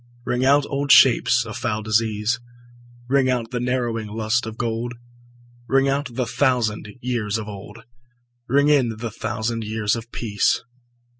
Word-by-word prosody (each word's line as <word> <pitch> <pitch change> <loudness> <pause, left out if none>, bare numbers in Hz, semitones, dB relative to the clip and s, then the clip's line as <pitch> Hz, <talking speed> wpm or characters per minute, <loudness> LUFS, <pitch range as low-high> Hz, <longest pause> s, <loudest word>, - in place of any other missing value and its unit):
Ring 125 0 0
out 140 +2 +4
old 140 0 -1
shapes 120 -2 +6
of 110 - -6
foul 110 -2 -2
disease, 110 0 0 0.7
Ring 135 0 +2
out 120 -3 -1
the 125 - -2
narrowing 120 -3 -1
lust 110 +2 -1
of 110 0 -7
gold; 120 +1 -3 0.7
Ring 135 0 +3
out 135 -2 -1
the 125 -1 0
thousand 120 -4 0 0.2
wars 115 -4 -1
of 110 -1 -6
old, 100 -2 -10 0.6
Ring 140 +3 +3
in 130 -6 +3
the 115 0 -5
thousand 110 +3 -3
years 105 0 -1
of 115 0 -8
peace. 105 -4 0
115 Hz, 150 wpm, -22 LUFS, 110-125 Hz, 0.7 s, shapes